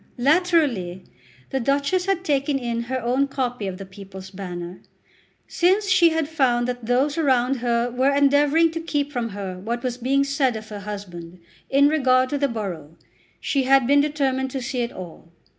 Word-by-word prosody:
Latterly 275 - +1 0.5
the 270 - 0
Duchess 280 +9 0
had 385 -2 0
taken 280 -2 +1
in 235 -2 -2
her 260 0 -1
own 255 +4 +1
copy 245 -6 -3
of 185 -1 -5
the 195 - -8
"People's 190 -1 -11
Banner." 180 -2 -7 0.7
Since 385 +3 +2
she 370 -3 +5
had 320 -2 -1
found 255 -6 +1
that 245 -2 -5
those 275 +6 +1
around 265 -3 +2
her 235 0 0
were 260 +3 +2
endeavouring 285 +3 +3
to 330 - -4
keep 290 -3 -2
from 240 -4 -2
her 195 -3 -6
what 235 +5 -4
was 250 -1 -3
being 270 +3 +2
said 275 -3 0
of 215 0 -8
her 210 -1 -6
husband 185 -4 -8 0.3
in 280 +1 +5
regard 260 -4 +2
to 290 - -1
the 280 - +2
borough, 180 - -6 0.4
she 275 -2 0
had 270 -1 +4
been 285 +3 +4
determined 270 -3 -1
to 265 0 -4
see 250 0 -2
it 235 - -2
all. 170 -2 -11
255 Hz, 180 wpm, -23 LUFS, 215-285 Hz, 0.7 s, she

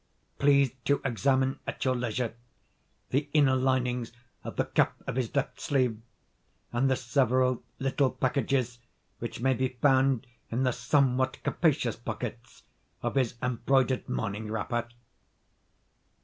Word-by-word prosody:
Please 140 -2 +4
to 140 - +3
examine, 135 +1 +1
at - - -3
your 130 -1 +2
leisure, 120 -1 -2 0.8
the 145 +2 0
inner 145 -4 +5
linings 125 -2 0 0.3
of - - -6
the - - +1
cuff - - +3 0.2
of - - -3
his 130 -1 -2
left 140 0 -1
sleeve, 125 -6 +1 0.7
and 130 +3 +2
the 130 - +3
several 130 0 +2 0.2
little 135 0 +1
packages 130 -2 0 0.4
which 120 0 -5
may 130 +1 +3
be 130 +1 0
found 130 0 +2 0.2
in 120 +3 0
the 125 -1 +2
somewhat 130 -2 +2
capacious 140 - +1
pockets 115 +1 -6 0.4
of - - -1
his 130 -4 +1
embroidered 130 +1 +1
morning 105 0 -3
wrapper." 120 +1 -2
130 Hz, 130 wpm, -29 LUFS, 120-135 Hz, 0.8 s, inner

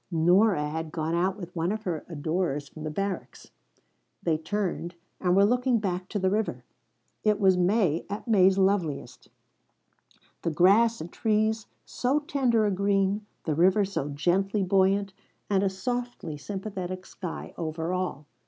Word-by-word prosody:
Nora 175 0 +3
had 160 +1 -4
gone 160 0 -2
out 185 +3 +1
with 180 -3 -9
one 170 +2 0
of 215 0 -3
her 170 -6 -3
adorers 155 -2 -2
from 155 +1 -10
the - - -2
barracks. 195 +5 -4 0.7
They 165 -2 +2
turned, 175 0 -3 0.2
and 180 0 +2
were 200 +1 +6
looking 250 +2 +2
back 185 -3 -3
to 210 - -2
the 190 -1 +1
river. 215 +1 -1 0.6
It 210 -1 +2
was 190 -2 +5
May 180 -3 +2
at 205 +4 -5
May's 195 -3 +5
loveliest: 190 -6 0 1.1
the - - 0
grass 200 +8 +4
and 170 +2 -8
trees 220 0 +1 0.2
so 255 +4 0
tender 260 -7 +1
a 205 - +2
green, 200 +1 +1 0.2
the 155 - -1
river 185 +6 +4
so 190 -7 -3
gently 190 +7 +1
buoyant, 195 +1 +2 0.4
and 195 -1 +3
a 195 - +2
softly 240 -4 -4
sympathetic 185 +1 -5
sky 180 -3 -7
over 160 +1 -3
all. 180 -5 -3
190 Hz, 155 wpm, -27 LUFS, 170-210 Hz, 1.1 s, were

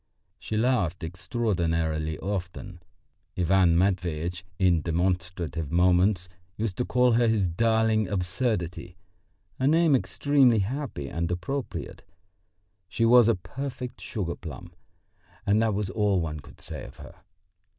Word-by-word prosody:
She 110 - -4
laughed 110 -9 +1
extraordinarily 80 -5 -1
often. 95 -1 -5 0.6
Ivan 90 -1 +3
Matveitch 90 -2 -1
in 90 -4 +3
demonstrative 85 -2 -2
moments 90 +2 +3 0.3
used 105 -3 -2
to 125 - 0
call 125 0 +3
her 120 +1 +3
his 110 -4 +2
"darling 110 +3 +2
absurdity" 90 -2 -2 0.6
a 130 - +2
name 160 -1 +4
extremely 130 +4 +3
happy 110 - -3
and 85 +3 -2
appropriate. 120 +10 -4 0.9
She 115 +3 0
was 120 0 +7
a 115 - +4
perfect 125 +5 -7
sugar 90 -6 -3
plum, 75 -7 -9 0.7
and 105 +2 +3
that 110 -3 +1
was 100 -2 -2
all 105 -3 +1
one 75 -3 -3
could 70 - -15
say - - -6
of - - -11
her. - - -11
95 Hz, 125 wpm, -27 LUFS, 85-115 Hz, 0.9 s, was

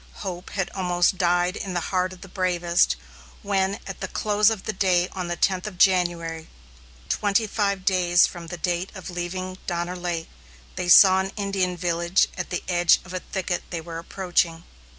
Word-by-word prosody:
Hope 180 -1 -5
had 195 -3 -3
almost 180 0 +1
died 175 +1 +2
in 190 -2 -5
the - - +2
heart 185 0 +1
of 185 - -12
the 195 - -10
bravest, 175 -2 +1 0.5
when 195 0 0
at 195 - -7
the 190 - -3
close 210 +2 +2
of 220 -4 -3 0.2
day 180 -2 +3
on 185 -2 -5
the 175 - -2
tenth 185 +2 0
of 195 -4 -8
January, 170 -3 +2 0.6
twenty 205 - +1
five 200 -3 -1
days 180 -2 +4
from 170 -2 -7
the 175 - -6
date 175 +2 -2
of 190 -1 -7
leaving 185 +1 -5
Donner 175 0 -2
Lake, 175 -2 -3 0.5
they 175 - -3
saw 190 +1 +8
an 190 0 -2
Indian 195 -3 -1
village 170 +1 +1
at 180 - -4
the 175 - -3
edge 175 -2 +4
of 185 - -10
a 185 - -2
thicket 180 -1 -3
they 170 - -3
were 165 0 -7
approaching. 170 -2 -1
180 Hz, 180 wpm, -24 LUFS, 175-190 Hz, 0.6 s, saw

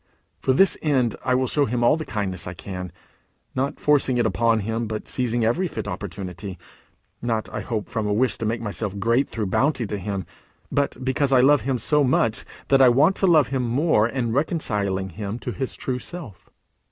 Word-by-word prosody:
For - - +1
this 190 +9 +4
end 130 -7 +1
I 125 - +2
will 130 +1 +2
show 145 +3 +2
him 120 0 -1
all 120 - +5
the 155 -1 -5
kindness 95 -6 -3
I 90 - -6
can, 90 +1 -6 0.6
not 135 +2 -2
forcing 140 -4 +2
it 120 - +2
upon 115 +1 +2
him, 115 +2 -2
but 110 0 -5
seizing 120 -2 0
every 170 +12 +1
fit 110 -9 -5
opportunity; 95 0 -6 0.6
not, 115 -2 -1
I - - -3
hope, 110 -4 -3
from 110 -2 -2
a - - 0
wish 120 +1 +2
to 110 - -1
make 115 +1 -1
myself 105 -2 -3
great 115 +6 +1
through 110 -2 -3
bounty 135 -4 +2
to 105 0 -4
him, 100 -1 -4 0.5
but 140 0 0
because 135 +1 +1
I 130 -2 +6
love 145 +2 +5
him 130 -1 -1
so 150 +4 +2
much 115 -4 +1 0.2
that 135 -1 +5
I 130 - +8
want 145 +10 +4
to 195 - +2
love 155 -7 +5
him 135 -1 -1
more 125 -1 +2
in 120 -2 -2
reconciling 105 - -1
him 100 +4 -5
to 125 - -5
his 130 +1 -4
true 125 -1 -3
self. 160 - -9
120 Hz, 200 wpm, -23 LUFS, 105-135 Hz, 0.6 s, I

